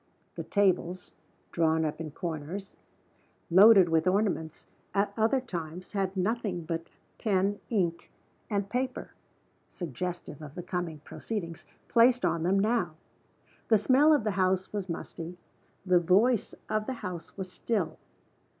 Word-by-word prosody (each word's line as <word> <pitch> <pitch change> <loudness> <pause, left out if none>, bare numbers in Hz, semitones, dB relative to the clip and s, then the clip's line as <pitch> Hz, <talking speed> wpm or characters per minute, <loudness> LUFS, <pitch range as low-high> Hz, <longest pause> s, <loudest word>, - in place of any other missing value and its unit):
The - - -5
tables, 185 -3 0 0.4
drawn 160 -1 +2
up 155 +1 -3
in 160 - -5
corners 165 +5 -5 0.8
loaded 195 0 +8
with 165 +1 +2
ornaments 185 -5 0 0.3
at 200 0 +1
other 225 +4 +2
times 180 -7 -6
had 195 -1 -2
nothing 195 -2 -1
but 165 0 -4 0.3
pen, 200 -1 +1
ink, 175 -7 -1 0.4
and 200 -2 -1
paper 255 +4 -3 0.6
(suggestive 175 -1 -5
of 150 -2 -9
the 175 - -5
coming 175 -4 -4
proceedings) 170 -6 -6 0.2
placed 245 +1 +4
on 165 - +1
them 185 +4 +2
now. 210 -6 +1 0.7
The 220 - +5
smell 265 +8 +5
of 295 -7 +4
the 215 - 0
house 185 0 0
was 200 -3 -3
musty; 170 +1 -6 0.5
the 180 -1 +5
voice 200 +7 +3
of 215 0 -1
the 265 - -1
house 175 -1 -7
was 185 -2 -5
still. 200 -5 -2
185 Hz, 135 wpm, -29 LUFS, 170-210 Hz, 0.8 s, loaded